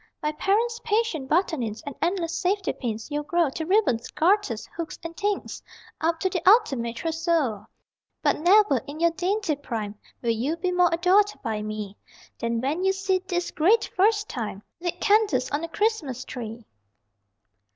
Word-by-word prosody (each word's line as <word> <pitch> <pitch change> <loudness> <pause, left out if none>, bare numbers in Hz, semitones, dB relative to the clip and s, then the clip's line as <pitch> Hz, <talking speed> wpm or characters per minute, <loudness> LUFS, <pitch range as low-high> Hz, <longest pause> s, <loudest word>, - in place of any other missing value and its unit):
By 300 - -1
parents' 445 +9 0
patient 420 - 0
buttonings, 295 - 0
And 285 - -5
endless 340 -1 0
safety 380 +2 0
pins, 225 +1 -5
you'll 295 0 -1
grow 330 -1 +1
To 320 +3 -4
ribbons, 365 - +2
garters, 330 - +1
hooks 335 -1 -5
and 335 0 -6
things, 410 +2 -2 0.4
Up 325 0 +1
to 375 - +2
the 355 - -1
Ultimate 270 - +3
Trousseau 320 - -1 0.6
But - - +2
never, 375 -2 +5
in 290 +2 -7
your 335 0 +4
dainty 370 -1 -1
prime, 225 -7 -4 0.3
Will 235 - +2
you 255 +9 -1
be 360 +2 -1
more 360 -1 +4
adored 370 +5 +4
by 215 -1 -2
me 210 -1 -5 0.4
Than 230 0 -1
when 295 +8 -1
you 385 0 +3
see, 385 -1 0
this 350 -1 -1
Great 415 +9 +3
First 415 +2 +3
Time, 210 -4 -5 0.2
Lit 350 0 -3
candles 405 - +2
on 295 +2 -1
a - - -2
Christmas 320 - -1
Tree! 230 -2 -7
330 Hz, 160 wpm, -25 LUFS, 255-385 Hz, 0.6 s, never